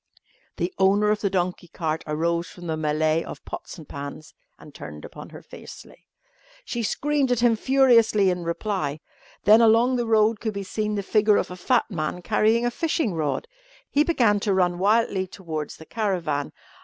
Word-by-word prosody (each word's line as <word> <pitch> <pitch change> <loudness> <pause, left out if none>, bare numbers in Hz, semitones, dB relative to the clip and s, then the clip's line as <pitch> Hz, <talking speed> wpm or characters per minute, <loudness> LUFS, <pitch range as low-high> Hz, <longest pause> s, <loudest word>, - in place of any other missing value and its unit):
The 175 +2 -2
owner 200 +2 +4
of 210 - -1
the 200 - +1
donkey 180 -1 -2
cart 160 -1 -3
arose 170 +3 -1
from 175 - -12
the 160 -2 -2
mêlée 155 +1 +1
of - - -10
pots - - -8
and 160 - -12
pans 145 +2 -8 0.2
and - - -15
turned - - -9
upon - - -10
her - - -12
fiercely. - - -13 0.6
She 240 - -3
screamed 280 +3 0
at 245 -2 +1
him 240 -2 +4
furiously 230 -6 +4
in 180 -1 -3
reply. 170 -3 -2 0.4
Then 215 +2 +7
along 230 +3 +4
the 240 -1 -1
road 220 -1 +3
could 220 -3 -3
be 200 - -3
seen 210 +2 -2
the 200 - -2
figure 210 +1 +3
of - - -2
a - - -6
fat 230 +5 +1
man 170 0 -3
carrying 225 +5 +2
a 240 - +1
fishing 315 - -1
rod. 155 - -2 0.4
He 290 - +4
began 235 -11 +2
to 200 -1 0
run 175 -1 +1
wildly 200 -1 +2
towards 160 -5 -6
the 160 - -12
caravan. 175 -10 -2
200 Hz, 180 wpm, -24 LUFS, 170-225 Hz, 0.6 s, Then